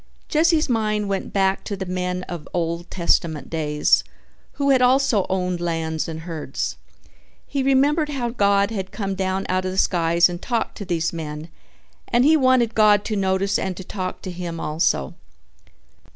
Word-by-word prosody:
Jesse's 320 0 +3
mind 215 -4 0
went 195 -1 -2
back 195 -1 +1
to 200 - -4
the 190 - -4
men 180 0 -2
of 175 -4 -7
Old 170 0 -2
Testament 170 -3 0
days 150 -2 +2 0.5
who 280 -1 +1
had 260 -2 +4
also 255 -5 +3
owned 180 -2 -1
lands 165 -2 -2
and 160 -1 -6
herds. 160 -2 -4 0.7
He 280 - -2
remembered 285 +4 +2
how 260 -5 -2
God 200 -2 +2
had 190 -4 -4
come 195 -1 -3
down 190 0 -2
out 185 0 0
of 185 - -2
the 190 - -6
skies 170 -2 +3
and 175 0 -6
talked 235 -3 -2
to 200 - -5
these 170 -2 -1
men 155 0 -6 0.6
and 240 +2 +3
he 315 +2 +6
wanted 255 -5 +3
God 210 -2 +4
to 215 - -2
notice 195 0 +1
and 185 -2 -3
to 190 - -7
talk 185 0 -5
to 185 - -5
him 175 -2 -5
also. 150 - 0
190 Hz, 170 wpm, -22 LUFS, 170-225 Hz, 0.7 s, he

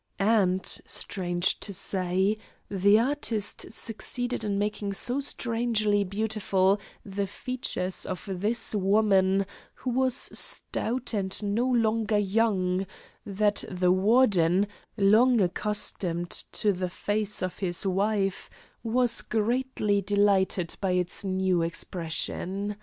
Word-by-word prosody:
And, 195 -3 +2 0.2
strange 175 -1 -1
to 200 - -5
say, 190 +2 0 0.3
the 200 +2 +4
artist 230 -4 -2
succeeded 235 +2 -3
in 205 -2 -1
making 205 0 -2
so 245 +7 -1
strangely 230 -6 0
beautiful 200 -1 0 0.3
the 200 0 -3
features 205 -4 -3
of 185 - -5
this 210 +6 -1
woman, 195 -1 +3 0.3
who 255 - -4
was 260 0 +2
stout 250 -2 0
and 195 -2 0
no 210 +5 0
longer 225 -3 +1
young, 195 -3 +1 0.4
that 205 +1 +2
the 180 -1 +1
Warden, 195 -2 +3 0.3
long 225 +5 +5
accustomed 180 -2 0
to 205 -1 +2
the 185 0 -3
face 205 +2 -2
of 185 - -4
his 180 -1 -1
wife, 195 0 0 0.3
was 240 +1 +2
greatly 225 -2 0
delighted 195 -3 +1
by 190 -2 +1
its 180 +1 -1
new 185 -2 +1
expression. 180 +4 -3
205 Hz, 110 wpm, -27 LUFS, 190-220 Hz, 0.4 s, long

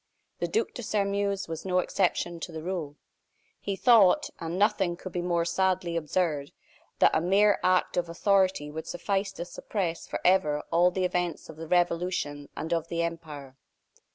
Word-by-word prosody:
The - - -1
Duc 445 +1 -1
de 245 - -6
Sairmeuse 200 -2 -1
was 165 -1 -6
no 185 -1 0
exception 175 -2 0
to 170 - -6
the 160 -1 -7
rule. 170 -5 -4 0.6
He 200 - -3
thought, 230 +5 +5
and 165 +1 -4
nothing 195 -3 +2
could 185 - -8
be 175 - -2
more 170 -1 0
sadly 180 -1 0
absurd, 155 -3 -1 0.4
that - - +4
a - - +2
mere 200 +4 +4
act 185 0 +2
of 175 -1 0
authority 185 -3 +1
would 160 +1 -6
suffice 195 +2 -1
to 170 - -6
suppress 180 -2 -4
forever 175 -6 +2
all 175 +2 +5
the 185 +1 -1
events 180 -1 -2
of 155 - -10
the 165 0 -7
Revolution 170 -4 0
and 160 - -2
of 165 -1 -1
the 170 0 -1
empire. 150 -5 -6
175 Hz, 170 wpm, -28 LUFS, 165-190 Hz, 0.6 s, thought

